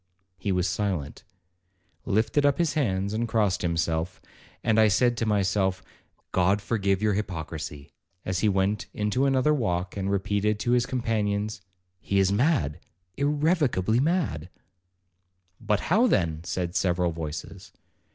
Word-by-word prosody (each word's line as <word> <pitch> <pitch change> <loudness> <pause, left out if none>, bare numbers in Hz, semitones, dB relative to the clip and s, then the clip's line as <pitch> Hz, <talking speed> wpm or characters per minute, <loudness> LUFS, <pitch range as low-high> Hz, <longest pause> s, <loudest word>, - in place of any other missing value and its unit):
He 100 +1 -1
was 90 0 +1
silent, 90 -6 -3 0.8
lifted 110 +8 +2
up 145 -1 +3
his 170 -3 +1
hands, 100 - 0
and 115 +2 -1
crossed 105 -5 +1
himself; 85 0 -1 0.4
and 110 -1 +3
I 110 - +6
said 120 +4 +3
to 115 - -1
myself, 95 -2 +1 0.5
'God 95 +3 +2
forgive 100 -2 0
your 105 -1 +3
hypocrisy,' 80 -7 -5 0.3
as 95 -2 -1
he 105 - +3
went 100 +2 0
into 105 +6 +1
another 135 +2 +3
walk, 90 -9 -1
and 100 -1 -2
repeated 100 +2 0
to 120 - 0
his 125 0 +3
companions, 105 -4 -1 0.4
'He 100 - -1
is 95 -1 +3
mad, 100 - +1 0.4
irrecoverably 145 - +1
mad.' 140 - 0 1.1
'But 105 -2 0
how, 220 +9 +3
then?' 80 - 0
said 90 0 -3
several 90 -3 +1
voices. 80 -2 -7
100 Hz, 135 wpm, -26 LUFS, 90-115 Hz, 1.1 s, I